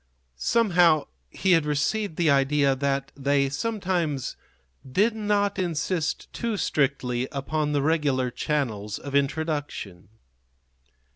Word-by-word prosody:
Somehow 175 Hz, -, +3 dB, 0.2 s
he 190 Hz, -, 0 dB
had 165 Hz, -3 st, +5 dB
received 155 Hz, +6 st, -1 dB
the 165 Hz, -3 st, +3 dB
idea 140 Hz, 0 st, +3 dB
that 140 Hz, 0 st, -1 dB
they 140 Hz, 0 st, +1 dB
sometimes 175 Hz, -, -2 dB, 0.6 s
did 215 Hz, -, +2 dB
not 205 Hz, -2 st, 0 dB
insist 170 Hz, -1 st, -2 dB
too 230 Hz, -3 st, -2 dB
strictly 130 Hz, -6 st, 0 dB
upon 150 Hz, +2 st, -2 dB
the 140 Hz, -1 st, +1 dB
regular 145 Hz, -5 st, +1 dB
channels 110 Hz, -8 st, -2 dB
of 140 Hz, -, -8 dB
introduction. 140 Hz, -, -2 dB
150 Hz, 110 wpm, -25 LUFS, 135-175 Hz, 0.6 s, had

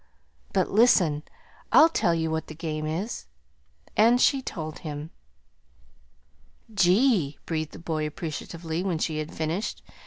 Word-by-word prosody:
But -, -, +1 dB
listen. 185 Hz, -9 st, +4 dB, 0.5 s
I'll 315 Hz, -, +8 dB
tell 175 Hz, -, +1 dB
you 160 Hz, -1 st, -1 dB
what 160 Hz, 0 st, -2 dB
the 155 Hz, -, -9 dB
game 155 Hz, -1 st, -3 dB
is." 180 Hz, +9 st, -4 dB, 0.7 s
And 235 Hz, +3 st, +5 dB
she 275 Hz, +1 st, +4 dB
told 155 Hz, -10 st, -6 dB
him. 150 Hz, 0 st, -6 dB, 1.6 s
"Gee!" 195 Hz, -, +3 dB
breathed 155 Hz, -2 st, -3 dB
the -, -, -9 dB
boy 160 Hz, -2 st, -2 dB
appreciatively, 160 Hz, +2 st, -5 dB
when 185 Hz, -4 st, 0 dB
she 155 Hz, -1 st, -1 dB
had 155 Hz, 0 st, -4 dB
finished. 160 Hz, +6 st, -3 dB
165 Hz, 130 wpm, -26 LUFS, 155-195 Hz, 1.6 s, I'll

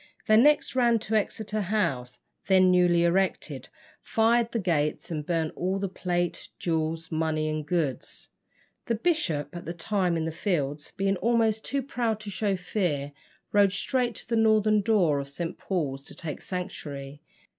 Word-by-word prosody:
They 215 Hz, -, +5 dB
next 290 Hz, +4 st, +4 dB
ran 240 Hz, -2 st, +4 dB
to 220 Hz, 0 st, -5 dB
Exeter 215 Hz, 0 st, 0 dB
House, 170 Hz, -12 st, -1 dB, 0.3 s
then 185 Hz, -1 st, +5 dB
newly 175 Hz, -1 st, +4 dB
erected, 185 Hz, +3 st, 0 dB, 0.3 s
fired 230 Hz, +1 st, +2 dB
the 235 Hz, -, -1 dB
gates, 165 Hz, -6 st, 0 dB
and 155 Hz, -2 st, -2 dB
burnt 160 Hz, 0 st, -1 dB
all 185 Hz, +2 st, -1 dB
the 195 Hz, 0 st, -1 dB
plate, 175 Hz, -2 st, -2 dB
jewels, 165 Hz, -1 st, -2 dB
money, 155 Hz, -1 st, 0 dB
and 155 Hz, 0 st, -2 dB
goods. 150 Hz, -4 st, -1 dB, 0.6 s
The 230 Hz, -, +1 dB
bishop, 215 Hz, -, 0 dB
at 175 Hz, -, -7 dB
that 170 Hz, +1 st, -5 dB
time 180 Hz, -1 st, 0 dB
in 160 Hz, -, -1 dB
the 165 Hz, -, -2 dB
fields, 150 Hz, -5 st, -2 dB
being 195 Hz, 0 st, +1 dB
almost 225 Hz, 0 st, +2 dB
too 275 Hz, 0 st, -2 dB
proud 235 Hz, -5 st, -1 dB
to 210 Hz, -1 st, -6 dB
show 200 Hz, 0 st, 0 dB
fear, 175 Hz, -6 st, -1 dB, 0.4 s
rode 200 Hz, -2 st, +4 dB
straight 240 Hz, +3 st, 0 dB
to -, -, -9 dB
the 230 Hz, -, 0 dB
northern 215 Hz, -1 st, +4 dB
door 190 Hz, -9 st, +3 dB
of 140 Hz, 0 st, -5 dB
St. 165 Hz, +4 st, -4 dB
Paul's 145 Hz, -8 st, -2 dB
to -, -, -9 dB
take 155 Hz, -4 st, -5 dB
sanctuary. 145 Hz, -6 st, -6 dB
180 Hz, 165 wpm, -27 LUFS, 160-215 Hz, 0.6 s, They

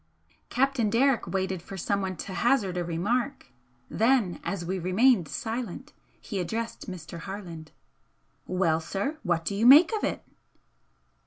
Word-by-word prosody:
Captain 260 Hz, -4 st, +1 dB
Derrick 255 Hz, +3 st, +2 dB
waited 190 Hz, -2 st, -2 dB
for 195 Hz, +3 st, -9 dB
someone 190 Hz, +1 st, -1 dB
to 190 Hz, -, -6 dB
hazard 215 Hz, -5 st, +1 dB
a 175 Hz, -, -1 dB
remark, 230 Hz, -, -2 dB, 0.4 s
then, 225 Hz, -5 st, +2 dB
as 185 Hz, -3 st, -3 dB
we 185 Hz, +2 st, -2 dB
remained 185 Hz, +1 st, +3 dB
silent, 235 Hz, +4 st, -5 dB, 0.3 s
he 205 Hz, -5 st, -5 dB
addressed 225 Hz, +5 st, -4 dB
Mr. 170 Hz, -2 st, -8 dB
Harland 175 Hz, -5 st, -8 dB, 0.8 s
"Well, 175 Hz, -4 st, +1 dB
sir, 205 Hz, -, -3 dB
what 170 Hz, -4 st, -1 dB
do -, -, -1 dB
you 215 Hz, +4 st, +2 dB
make 310 Hz, -, +8 dB
of 430 Hz, -, -2 dB
it?" -, -, -2 dB
200 Hz, 140 wpm, -27 LUFS, 180-245 Hz, 0.8 s, make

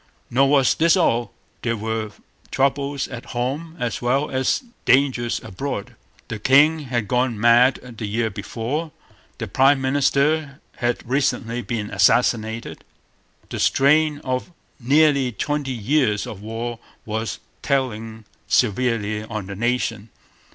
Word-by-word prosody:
Nor 135 Hz, +3 st, +4 dB
was 135 Hz, -3 st, +4 dB
this 165 Hz, +3 st, +3 dB
all. 120 Hz, -9 st, +1 dB, 0.3 s
There 115 Hz, -1 st, -1 dB
were 110 Hz, 0 st, -3 dB, 0.4 s
troubles 140 Hz, +1 st, 0 dB
at 120 Hz, -2 st, -7 dB
home 145 Hz, +7 st, -3 dB
as 120 Hz, -3 st, -2 dB
well 135 Hz, +4 st, 0 dB
as 130 Hz, -, 0 dB, 0.2 s
dangers 130 Hz, -3 st, +2 dB
abroad. 100 Hz, +1 st, -5 dB, 0.3 s
The 110 Hz, -, -5 dB
king 145 Hz, +7 st, +5 dB
had 120 Hz, -4 st, -2 dB
gone 125 Hz, -3 st, 0 dB
mad 120 Hz, +1 st, +3 dB
the 110 Hz, -, -3 dB
year 110 Hz, +2 st, -1 dB
before. 135 Hz, -, -4 dB, 0.5 s
The -, -, -4 dB
prime 135 Hz, +1 st, +4 dB
minister 140 Hz, +2 st, +1 dB, 0.2 s
had 120 Hz, 0 st, -2 dB
recently 125 Hz, -3 st, 0 dB
been 105 Hz, -1 st, -4 dB
assassinated. 115 Hz, -2 st, +1 dB, 0.7 s
The -, -, -5 dB
strain 150 Hz, +2 st, +3 dB
of 130 Hz, +6 st, -3 dB, 0.3 s
nearly 140 Hz, 0 st, +3 dB
twenty 145 Hz, +5 st, -2 dB
years 120 Hz, -2 st, +1 dB
of 100 Hz, -, -8 dB
war 115 Hz, +2 st, -5 dB, 0.3 s
was 110 Hz, +1 st, -3 dB, 0.2 s
telling 115 Hz, -5 st, -2 dB, 0.2 s
severely 110 Hz, -2 st, +1 dB
on 110 Hz, -2 st, -5 dB
the 100 Hz, +1 st, -7 dB
nation. 115 Hz, -1 st, -1 dB
125 Hz, 125 wpm, -22 LUFS, 115-140 Hz, 0.7 s, king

